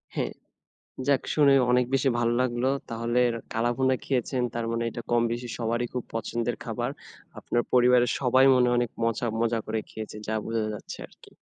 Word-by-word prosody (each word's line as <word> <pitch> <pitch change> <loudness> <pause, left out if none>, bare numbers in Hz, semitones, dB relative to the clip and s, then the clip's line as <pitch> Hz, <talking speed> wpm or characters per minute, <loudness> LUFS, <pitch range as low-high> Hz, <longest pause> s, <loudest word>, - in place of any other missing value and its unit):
হ্যাঁ। - - -1 0.8
যাক 140 -2 +3
শুনে 145 -2 +5 0.2
অনেক 125 0 +4
বেশি 135 0 +2
ভাল 120 -1 +2
লাগল। 120 -1 0 0.3
তাহলে 115 +2 0 0.3
কালাভুনা 120 +3 +1
খেয়েছেন 125 -1 -1
তার 115 -1 -2
মানে 115 0 -1
এটা 120 - -6
কমবেশি 120 +1 0
সবারই 120 +1 -1
খুব 125 -2 -2
পছন্দের 115 +1 -2
খাবার। - - -2 0.5
আপনার 120 - 0
পরিবারের 125 -1 +5
সবাই 130 +1 +4
মনে 125 -1 +4
অনেক 120 -2 0
মজা 115 +1 0
মজা 115 0 +1
করে 110 0 -1
খেয়েছে 110 -1 -7
যা 110 - 0
বোঝা 115 -1 -1
যাচ্ছে - - -8
আরকি। - - -20
120 Hz, 160 wpm, -27 LUFS, 115-125 Hz, 0.8 s, শুনে